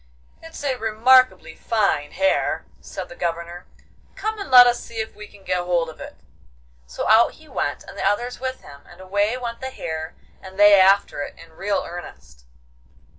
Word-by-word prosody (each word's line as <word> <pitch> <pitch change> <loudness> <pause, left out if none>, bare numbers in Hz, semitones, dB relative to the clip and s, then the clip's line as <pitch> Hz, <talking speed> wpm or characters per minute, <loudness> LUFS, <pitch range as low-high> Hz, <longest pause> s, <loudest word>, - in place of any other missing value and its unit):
'It's 325 -2 -10
a 270 -3 -1
remarkably 245 +4 +3
fine 200 -10 0
hare!' 190 +1 0
said - - -8
the 255 - -12
Governor. 170 -2 -5 0.5
'Come 435 0 -4
and 400 - -6
let 250 -1 +10
us 245 0 +2
see 235 - -12
if 220 0 -4
we 210 0 -10
can 200 -1 -19
get 180 -1 -1
hold 175 -2 0
of 160 - -12
it.' - - -9 0.7
So 60 - -5
out 220 +2 +5
he 315 - -19
went, - - -3
and - - -12
the - - -5
others 240 +4 -1
with 260 0 -5
him, 140 -1 -14
and 175 - -16
away 205 +5 -1
went 235 -2 -6
the 260 - -4
hare, 160 -10 -6 0.3
and 190 0 -12
they 205 -1 +7
after 195 -5 +3
it, - - -6
in 165 -1 -15
real 195 +4 -2
earnest. 115 - -11
205 Hz, 185 wpm, -22 LUFS, 175-245 Hz, 0.7 s, let